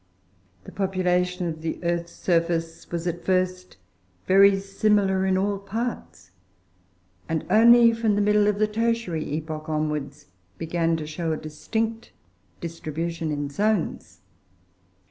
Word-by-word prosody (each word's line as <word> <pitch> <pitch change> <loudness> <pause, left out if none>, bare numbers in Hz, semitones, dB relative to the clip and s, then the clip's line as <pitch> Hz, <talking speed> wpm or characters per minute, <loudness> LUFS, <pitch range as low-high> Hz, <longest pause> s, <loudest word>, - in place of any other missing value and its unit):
The - - -11
population 180 -2 0
of 160 -1 -5
the 160 0 -3
earth's 170 0 -2
surface 165 -1 -1
was 170 0 -4
at 175 0 -3
first 185 - -1 0.5
very 195 +1 +6
similar 195 -1 +1
in 190 0 +2
all 200 +1 0
parts, 200 - -5 1.0
and 160 -1 -1
only 230 +2 +7
from 225 -2 +1
the 205 - +1
middle 210 0 +3
of 210 -1 +1
the 215 - +3
Tertiary 225 -6 -1
epoch 155 0 -5
onwards, 150 -2 -3 0.3
began 165 0 0
to 155 - -5
show 160 +1 -3
a - - -2
distinct 220 +10 -4 0.5
distribution 165 0 -4
in 145 -1 -3
zones. 175 - -1
180 Hz, 125 wpm, -25 LUFS, 160-205 Hz, 1.0 s, only